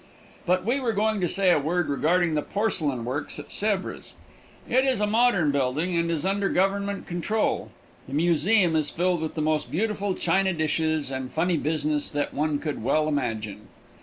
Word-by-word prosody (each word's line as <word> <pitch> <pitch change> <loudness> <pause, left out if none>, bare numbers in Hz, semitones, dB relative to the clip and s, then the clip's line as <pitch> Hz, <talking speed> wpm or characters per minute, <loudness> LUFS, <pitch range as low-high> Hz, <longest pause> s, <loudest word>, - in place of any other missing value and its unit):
But 180 +1 +2
we 250 +5 +1
were 240 -4 -1
going 215 0 0
to 175 - +2
say 190 -1 +3
a 175 - +4
word 170 +4 0
regarding 165 +4 +1
the 150 - +1
porcelain 155 - -1
works 135 +4 -4
at 150 - -9
Sèvres. 205 -2 -1 0.5
It 260 +1 +3
is 260 -5 +1
a 210 - +2
modern 210 -8 +3
building 140 +6 0
and 170 0 +1
is 165 -1 -1
under 195 +1 +1
government 200 +2 0
control. 190 +5 -1 0.4
The 135 - -5
museum 170 +3 +3
is 155 -2 +1
filled 175 0 0
with 160 - -4
the 155 - -1
most 155 0 0
beautiful 205 +1 -1
china 190 +2 +1
dishes 155 -2 0
and 130 -1 -4
funny 175 +2 +1
business 150 -1 0
that 145 0 -2
one 150 0 0
could 150 0 -4
well 155 0 +1
imagine. 110 -8 -3
170 Hz, 180 wpm, -25 LUFS, 150-195 Hz, 0.5 s, a